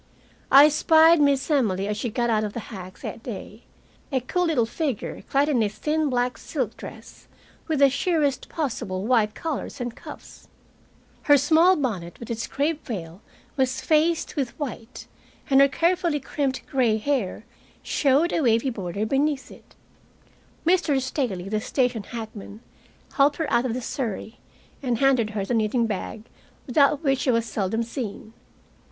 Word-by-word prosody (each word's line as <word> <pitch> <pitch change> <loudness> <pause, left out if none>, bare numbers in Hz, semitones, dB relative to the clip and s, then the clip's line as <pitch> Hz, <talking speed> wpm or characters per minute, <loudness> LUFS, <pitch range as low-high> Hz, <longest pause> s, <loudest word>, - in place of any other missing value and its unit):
I 280 +2 +9
spied 320 +1 +5
Miss 280 +1 +2
Emily 200 -9 +1
as 210 - -1
she 230 +3 -3
got 240 +1 0
out 215 -1 +2
of 210 -1 -4
the - - -4
hack 185 -1 -9
that - - -6
day, 220 -1 -8 0.5
a 265 - +1
cool 355 +9 -1
little 295 -9 +2
figure 270 -1 -3
clad 280 +1 +2
in 270 -6 +2
a 210 - +1
thin 300 +8 -1
black 250 -1 -1
silk - - -3
dress, - - -12 0.4
with 315 -2 0
the 280 0 +6
sheerest 290 -3 0
possible 205 - -3
white 220 -3 +2
collars 320 -4 -4
and 240 -1 -4
cuffs. - - -12 0.8
Her 290 - +8
small 320 +6 +5
bonnet 200 - -3
with 235 - -7
its 230 0 -3
crepe 295 +3 -1
veil 180 - -6 0.3
was 260 -1 0
faced 320 +1 +1
with 270 -6 -3
white, 250 -4 -6 0.5
and 270 0 +7
her 275 - +7
carefully 335 +2 +1
crimped 270 -1 -3
gray 245 -5 +1
hair 220 -4 -2 0.4
showed 290 +4 +2
a - - +1
wavy 235 0 +2
border 200 -1 -3
beneath 275 +3 0
it. - - -17 0.9
Mr. 340 -5 +3
Staley, 250 - -3
the 215 +1 -1
station 245 -2 0
hackman, 220 -2 -8 0.5
helped 285 0 +3
her 320 -3 -2
out 235 +1 +3
of 235 - -2
the 255 - -4
surrey, 230 -5 -4 0.4
and 245 -4 0
handed 260 -4 +3
her 205 -2 -3
the 245 - -2
knitting 230 +1 +1
bag 215 0 -4 0.4
without 280 +3 +3
which 270 -3 +2
she - - -1
was 230 -2 +2
seldom 225 +1 -1
seen. 225 -2 -6
255 Hz, 160 wpm, -24 LUFS, 220-290 Hz, 0.9 s, I